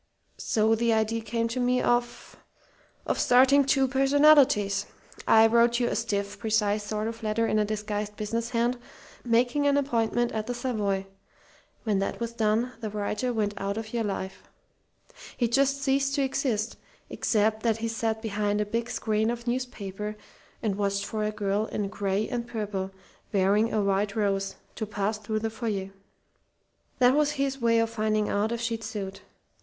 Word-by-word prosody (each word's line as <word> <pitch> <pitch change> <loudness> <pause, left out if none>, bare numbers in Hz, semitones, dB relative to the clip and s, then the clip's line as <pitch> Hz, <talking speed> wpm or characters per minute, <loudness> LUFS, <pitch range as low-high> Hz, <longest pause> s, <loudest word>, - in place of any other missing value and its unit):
So 220 0 +2
the 230 +1 +2
idea 220 +1 0
came 230 +1 -1
to 245 +2 -3
me 250 0 +2
of 240 0 -1 0.7
of - - -1
starting 265 +3 +5
two 270 0 +2
personalities. 270 -7 +4 0.4
I 220 0 +7
wrote 235 +1 +4
you 240 - +1
a - - -2
stiff, 200 -3 -2
precise 215 -2 +1
sort 215 +1 -3
of 230 0 -6
letter 220 +1 0
in 215 -1 +1
a 210 - +2
disguised 210 0 -3
business 230 +3 -3
hand, 240 +1 0 0.4
making 245 +4 +2
an 285 0 +3
appointment 240 -3 +1
at 220 0 -3
the 245 - -2
Savoy. 210 -6 -1 0.8
When 210 -4 +1
that 195 - -2
was 235 0 -3
done, 225 +2 +1
the 220 -2 -4
writer 210 +4 -2
went 210 -3 -1
out 200 +1 -3
of 225 0 -6
your 235 -1 0
life. 190 -2 -4 1.0
"He 240 - +2
just 275 +3 +1
ceased 275 0 +1
to 280 - +1
exist, 235 -5 -1 0.3
except 220 0 +1
that 225 -1 +1
he 230 0 -2
sat 225 0 -2
behind 210 -1 -1
a 210 - +1
big 230 +3 -2
screen 220 0 0
of 235 0 -4
newspaper 210 -5 -4 0.5
and 205 -3 0
watched 200 -1 0
for 215 0 -3
a 210 - 0
girl 210 0 -1
in 205 -2 -3
gray 200 +1 -1
and 240 -2 -3
purple, 205 -4 -3 0.4
wearing 205 +3 +2
a 215 - +1
white 200 +1 0
rose, 195 -2 0 0.2
to 220 - -3
pass 210 +1 -2
through 215 +1 -3
the 225 0 -2
foyer. 210 -4 -3 1.1
That 250 0 +5
was 295 0 +2
his 275 -2 -2
way 230 -1 +3
of 230 0 +1
finding 215 -1 0
out 210 +2 0
if 235 0 -2
she'd 230 -1 -2
suit. 195 -3 -5
220 Hz, 170 wpm, -27 LUFS, 210-240 Hz, 1.1 s, I